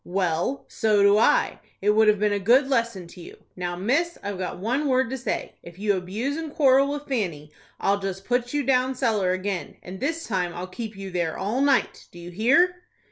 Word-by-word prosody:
"Well, 180 +7 -1
so 210 -2 +2
do 200 +1 +5
I. - - +2 0.2
It 205 +2 +2
would 220 +1 +4
have 210 0 +5
been 210 +1 +1
a 205 - 0
good 245 +7 +4
lesson 230 -8 -1
to 175 - -12
you. - - -13
Now, 175 -1 -3
miss, 285 - 0
I've 200 -2 -4
got 185 - -4
one 250 +10 -1
word 260 -2 +1
to 265 - -2
say. 255 - -3
If 170 0 -13
you 205 0 +1
abuse 210 - -3
and 320 -2 -5
quarrel 275 -1 +4
with 290 0 -6
Fanny, 170 - -3 0.3
I'll 200 +1 +1
just 195 0 -5
put 245 +1 0
you 290 0 0
down 260 0 +1
cellar 220 -7 +1
again, 185 0 -3
and 185 +1 -8
this 325 +6 -2
time 180 -5 -2
I'll 175 +1 -4
keep 215 +3 -7
you 195 -1 -7
there 170 -3 -2
all 215 +7 -1
night. 275 -2 +1
Do - - -14
you 175 0 -9
hear?" 340 - +3
210 Hz, 215 wpm, -24 LUFS, 185-265 Hz, 0.3 s, do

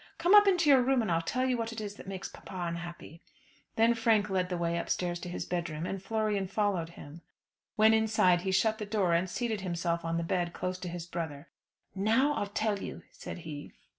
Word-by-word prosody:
Come 350 +4 +3
up 415 -1 +9
into 355 -5 +3
your 265 -2 +7
room, 255 -1 +2
and 215 - -1
I'll 165 0 +2
tell 255 +10 -1
you 255 -2 +1
what 230 0 -2
it 225 - -6
is 205 -2 -5
that 205 - -12
makes 195 0 -5
papa - - -12
unhappy." 170 0 -7 0.5
Then 225 +1 +4
Frank 225 -3 +2
led 185 -1 0
the 180 - -2
way 170 0 0
upstairs 175 0 -2
to 175 - -6
his 175 - -4
bedroom, 170 -2 -3
and 195 0 -4
Florian 210 -2 -1
followed 195 -4 0
him. 150 +4 -11 0.5
When 220 +1 +6
inside 220 -5 +3
he 190 - -1
shut 220 +4 +2
the 210 - -3
door, 200 -5 +1
and 175 +2 +1
seated 220 0 -2
himself 170 -2 -2
on 165 0 -1
the 170 - -1
bed 175 0 -1
close 185 0 -3
to 180 -1 -5
his 170 -1 -6
brother. 160 -5 -6 0.4
"Now 225 +9 +2
I'll 205 - -2
tell 205 0 -1
you," - - -7
said 175 - -8
he. 145 -2 -7
190 Hz, 220 wpm, -30 LUFS, 170-220 Hz, 0.5 s, up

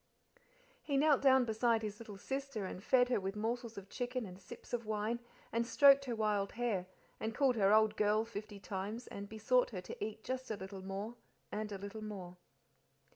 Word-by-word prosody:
He 280 -2 0
knelt 290 -1 +5
down 265 -2 +6
beside 225 0 +2
his 210 -1 -4
little 215 -3 -8
sister 270 -2 -3
and 185 0 -6
fed 245 0 +4
her 245 - +2
with 195 +1 -3
morsels 230 +1 -2
of 195 -1 -7
chicken 245 +2 -3
and 185 0 -10
sips 180 - -11
of 240 -1 0
wine, 215 +2 -1 0.3
and 230 +1 +1
stroked 275 +3 +6
her 245 -3 -2
wild 210 -2 0
hair, 220 -7 -1 0.3
and 220 0 -3
called 270 -3 +3
her 200 -3 +4
old 215 0 +5
girl 215 +1 +3
fifty 210 -2 -7
times, 205 +5 -4
and 200 0 -7
besought 220 +3 +2
her 190 -6 -5
to 180 - -6
eat 215 0 -5
just 260 +1 -3
a 215 - -2
little 190 0 -7
more 200 +5 -5 0.3
and 210 0 -3
a 200 - -3
little 200 +3 -7
more. 185 -4 -7
220 Hz, 195 wpm, -35 LUFS, 200-245 Hz, 0.3 s, down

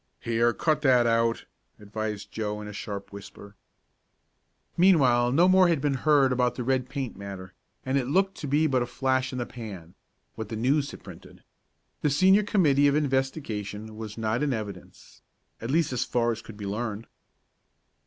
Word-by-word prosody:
"Here! 115 +1 +1
Cut 155 +4 0
that 125 -4 +4
out," 115 0 +1 0.3
advised 105 0 -5
Joe, 105 -1 -3
in 105 - -7
a 105 - -8
sharp 100 0 -7
whisper. 100 0 -11 1.2
Meanwhile 130 -10 +4
no 165 +7 +4
more 185 0 +6
had 165 -4 +2
been 145 0 0
heard 140 -1 +3
about 125 -1 +1
the 125 - -4
red 130 0 0
paint 135 -3 -4
matter, 95 -2 -8 0.3
and 130 +1 +1
it 125 - -3
looked 190 +6 +2
to 150 - -5
be 145 +3 +2
but 130 -4 +2
a 120 - -2
flash 130 +1 0
in 130 - -5
the 120 - -2
pan 100 -9 -9 0.4
what 110 -1 -7
the 110 - -4
News 140 +6 +1
had - - -11
printed. - - -13 0.6
The 150 - +2
Senior 190 +8 +5
committee 150 -9 +3
of 140 - +2
investigation 130 -7 -2
was 110 -1 -8
not 110 +3 -1
in 145 -3 +1
evidence 100 -5 -8 0.4
at 115 - -5
least 155 -1 +1
as 125 - 0
far 120 -1 0
as 115 - -5
could 110 - -12
be 105 - -7
learned. 110 +1 -4
125 Hz, 180 wpm, -26 LUFS, 110-140 Hz, 1.2 s, more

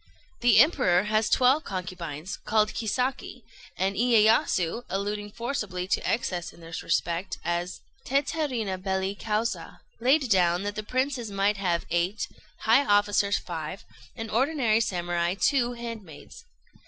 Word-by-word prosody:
The 240 -3 +5
Emperor 225 - +5
has 215 +1 +1
twelve 260 +5 +4
concubines, 175 -3 -5
called 215 -1 +1
Kisaki; 250 +4 -2 0.3
and 195 +1 0
Iyéyasu, 220 -4 +3
alluding 205 +1 -3
forcibly 210 -6 -4
to - - +1
excess 180 -7 -2
in - - -18
this 165 0 -7
respect 170 +2 -1
as 175 +1 -2 0.2
teterrima 260 - -1
belli 190 0 -1
causa, 210 -4 -3 0.2
laid 265 +4 +3
down 180 -1 +3
that 205 0 -3
the 215 - -4
princes 255 +1 -2
might 200 +1 +1
have 175 -3 0
eight, 175 +5 0 0.3
high 230 +6 +5
officers 205 -2 +3
five, 165 +1 -6 0.3
and 225 -2 -6
ordinary 240 -3 +2
Samurai 175 -4 -1
two 245 -4 +2
handmaids. 230 -10 -9
205 Hz, 130 wpm, -27 LUFS, 180-235 Hz, 0.3 s, The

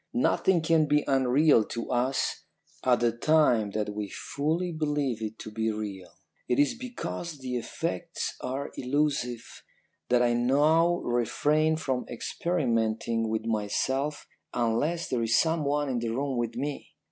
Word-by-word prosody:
Nothing 190 -8 +2
can 160 -1 +3
be 150 0 +3
unreal 135 0 +4
to 115 +4 -5
us 130 +2 0 0.4
at 125 -2 +3
the 120 -1 +3
time 120 -4 +3
that 105 -1 -1
we 105 -1 -4
fully 160 - -2
believe 145 -7 -1
it 110 0 -4
to 110 - -8
be 110 +1 -1
real. 105 -3 -6 0.4
It 125 - +1
is 145 0 +3
because 175 - -6
the 130 -2 -4
effects 165 +7 -3
are 135 +3 -4
illusive 130 -3 -1 0.6
that 125 0 +4
I 120 -1 +3
now 150 +8 +3
refrain 150 +6 +1
from 130 -5 -2
experimenting 115 -5 -1
with 110 0 -2
myself 130 +7 -1 0.3
unless 125 +9 0
there 125 - -1
is 115 0 +3
someone 150 -3 +1
in 125 -3 -1
the 115 -1 -2
room 135 +3 -1
with 120 -1 -2
me. 140 +3 -5
130 Hz, 145 wpm, -28 LUFS, 115-150 Hz, 0.6 s, unreal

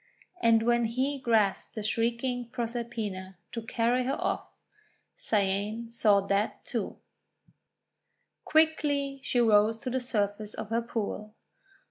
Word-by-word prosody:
And 225 -1 +5
when 240 0 +3
he 260 +5 -1
grasped 220 -6 +1
the 215 - -4
shrieking 235 +2 -1
Proserpina 230 -6 -4
to 230 - -4
carry 235 +3 +1
her 270 +2 -1
off, - - -1 0.7
Cyane 210 +3 0
saw 210 -4 +4
that 200 +2 -1
too. - - -3 1.5
Quickly 290 -3 +2
she 250 -1 0
rose 220 -1 +5
to 255 +2 -5
the 260 - +1
surface 210 -4 -2
of - - -6
her 230 +1 +2
pool. 215 -2 -4
230 Hz, 120 wpm, -29 LUFS, 210-245 Hz, 1.5 s, And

